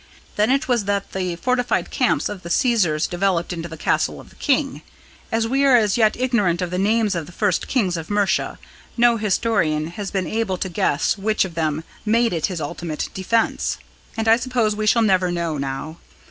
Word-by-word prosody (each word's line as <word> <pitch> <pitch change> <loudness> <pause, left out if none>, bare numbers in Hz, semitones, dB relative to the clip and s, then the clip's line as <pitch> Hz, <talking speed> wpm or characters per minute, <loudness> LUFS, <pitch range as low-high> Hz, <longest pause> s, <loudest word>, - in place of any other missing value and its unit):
Then 210 +2 +2
it 275 +3 +1
was 240 -5 +1
that 200 0 -1
the 185 -2 -2
fortified 250 +6 0
camp - - +1
of 205 -3 -6
the 170 - -8
Caesars 175 -8 +2
developed 175 -1 0
into 170 0 -5
the 160 - -8
castle - - 0
of - - -14
the - - -20
king. 275 0 0 0.5
As 225 0 +1
we 270 +4 +1
are 270 -2 +6
as 215 -4 +3
yet 220 -2 +3
ignorant 220 -9 +1
of 180 -1 -2
the 180 - -1
names 215 +1 +2
of 170 -3 -3
the - - -11
first 190 0 0
kings 190 -9 0
of 160 -1 -7
Mercia, 205 -1 0 0.4
no 235 0 +4
historian 180 -7 0
has 200 +2 -5
been 190 -2 -2
able 210 +1 -1
to 190 - -3
guess 165 +2 0
which 215 0 +1
of 180 - -7
them 160 -1 -1 0.2
made 230 +1 +2
it 165 -3 0
his 180 -3 -4
ultimate 155 +1 -4
defence; 225 +4 0 0.4
and 225 0 -1
I 225 +1 +6
suppose 240 -4 0
we 215 0 -2
shall 230 +2 +4
never 185 -4 +2
know 170 -4 -2
now. 140 +4 -5
200 Hz, 200 wpm, -21 LUFS, 170-225 Hz, 0.5 s, are